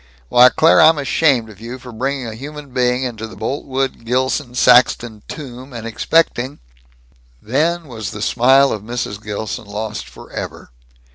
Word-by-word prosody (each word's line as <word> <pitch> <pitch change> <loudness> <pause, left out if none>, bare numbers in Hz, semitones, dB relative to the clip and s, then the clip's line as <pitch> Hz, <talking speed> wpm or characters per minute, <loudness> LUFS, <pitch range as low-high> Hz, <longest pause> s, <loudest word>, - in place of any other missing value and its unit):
Why, 125 +1 +7
Claire, 165 +5 +5
I'm 160 0 +6
ashamed 140 -4 +2
of 105 0 -16
you 120 +2 -7
for 125 -1 -11
bringing 130 +3 -3
a 115 - -5
human 145 +4 -9
being 125 0 +1
into 110 -3 -4
the 110 - -12
Boltwood 135 +3 -3
Gilson 125 +2 -1
Saxton 120 -3 +4
tomb 130 -2 -9
and 115 -1 -7
expecting 130 +2 +1 0.5
" - - -33
Then 165 +3 +1
was 110 -5 -6
the 105 -1 -6
smile 135 +4 +4
of 105 - -3
Mrs. 110 -2 -4
Gilson 110 +2 -5
lost 105 +1 -5
forever. - - -8
125 Hz, 155 wpm, -18 LUFS, 110-135 Hz, 0.5 s, Why